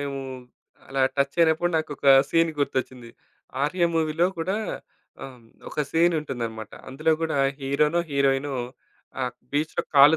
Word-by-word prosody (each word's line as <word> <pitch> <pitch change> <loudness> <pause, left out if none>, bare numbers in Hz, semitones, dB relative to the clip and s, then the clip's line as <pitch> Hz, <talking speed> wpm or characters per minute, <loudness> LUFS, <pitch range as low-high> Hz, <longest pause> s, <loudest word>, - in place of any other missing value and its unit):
మేము, 140 -1 -3 0.7
అలా 135 0 -2 0.2
టచ్చయినప్పుడు 160 +4 +2
నాకోక 150 -3 -3 0.2
సీన్ 165 0 +3
గుర్తొచ్చింది. 130 -4 -2 0.5
ఆర్య 170 +4 +1
మూవీ‌లో 160 +2 +2
కూడా 185 +5 -1 0.7
ఆహ్, 130 -2 -10 0.3
ఒక 150 - -2
సీనుంటుందన్నమాట. 135 -10 -1 0.2
అందులో 155 +5 +1
గూడా 160 -2 -1 0.2
హీరో‌నో, 150 +5 +1
హీరోయినో 140 0 +1 0.7
ఆహ్, 125 -1 -1 0.2
బీచ్‌లో 155 +3 0
కాళ్ళు 145 +3 +8
145 Hz, 110 wpm, -25 LUFS, 135-160 Hz, 0.7 s, కాళ్ళు